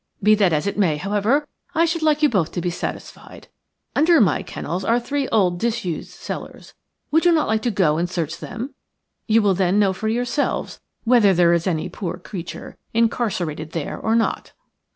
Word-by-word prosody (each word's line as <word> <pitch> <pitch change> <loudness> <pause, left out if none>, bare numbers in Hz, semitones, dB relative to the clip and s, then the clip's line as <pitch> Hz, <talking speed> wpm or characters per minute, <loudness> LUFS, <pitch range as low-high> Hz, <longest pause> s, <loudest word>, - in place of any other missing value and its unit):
Be 210 +1 +6
that 200 -4 +3
as 150 +1 0
it 200 +1 -2
may, 165 -7 +2
however, 210 - 0 0.3
I 330 +2 +4
should 335 0 -1
like 305 -1 +2
you 300 - +6
both 185 - 0
to - - -2
be 175 - -1
satisfied. - - -7 0.5
Under 320 +2 +5
my 195 - +3
kennels 175 +5 -5
are 230 +4 +2
three 275 +3 -2
old 180 -5 +2
disused 220 -7 -2
cellars. - - -8 0.4
Would 320 +2 +3
you 350 - +6
not 320 -2 +2
like 220 0 +1
to 240 - 0
go 185 -8 +2
and 175 +1 -1
search 170 -2 -3
them? 245 +8 -6 0.5
You 225 -1 +4
will 200 -2 +4
then 185 +1 +1
know 200 -2 +3
for 220 +4 -4
yourselves 245 +5 -1 0.2
whether 225 -5 +4
there 170 0 +4
is 170 +2 0
any 165 -4 -1
poor 180 -3 -5
creature 180 -1 -8 0.2
incarcerated 185 -9 -1
there 165 -4 -3
or 225 - 0
not." 230 - -1
205 Hz, 190 wpm, -22 LUFS, 175-240 Hz, 0.5 s, Be